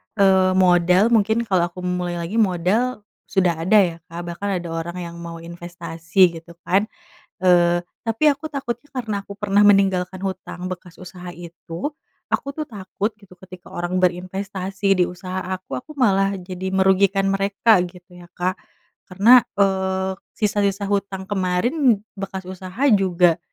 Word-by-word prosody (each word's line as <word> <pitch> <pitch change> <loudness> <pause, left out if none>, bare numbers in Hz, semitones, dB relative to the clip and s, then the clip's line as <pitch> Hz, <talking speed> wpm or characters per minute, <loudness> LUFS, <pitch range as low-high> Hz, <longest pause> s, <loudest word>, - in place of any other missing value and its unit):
eee, 190 -1 +4
modal 180 +4 +4
mungkin 225 +1 +3
kalau 185 -5 +1
aku 180 +1 -10
memulai 180 -1 -2
lagi 175 +7 -2
modal 210 +5 +1 0.2
sudah 175 -4 +1
ada 215 +5 +3
ya 175 -4 +2
Kak 170 +1 -7
bahkan 200 +4 -4
ada 170 - -7
orang 165 +2 -4
yang 170 0 -8
mau 165 -1 -8
investasi 170 0 0
gitu 170 +1 -16
kan, 200 +4 +2 0.5
eee, 175 -1 +4 0.2
tapi 225 +5 -2
aku 295 +2 0
takutnya 270 -1 -4
karena 230 -6 -3
aku 200 - -13
pernah 205 0 +3
meninggalkan 190 -2 +3
hutang 185 -1 -5
bekas 180 -1 -8
usaha 180 -1 -9
itu 170 - -7 0.4
aku - - 0
tuh 310 -1 -3
takut 205 0 -4
gitu 200 -3 -18
ketika 185 -1 -13
orang 175 +1 -2
berinvestasi 190 +2 -2
di - - +6
usaha 185 +1 -5 0.2
aku 185 - -7
aku 305 +5 -14
malah 195 -6 +2
jadi 185 0 -6
merugikan 195 +1 +3
mereka 200 +1 +3
gitu 180 0 -16
ya 175 - -13
Kak, 185 +3 -2 0.5
karena, 210 +7 +7 0.2
eee, 190 -1 +1 0.2
sisa-sisa 200 -1 0
hutang 200 -1 -2
kemarin 205 - +1 0.2
bekas 190 -1 -5
usaha 185 0 -9 0.2
juga 180 -4 +3
190 Hz, 150 wpm, -22 LUFS, 180-200 Hz, 0.5 s, karena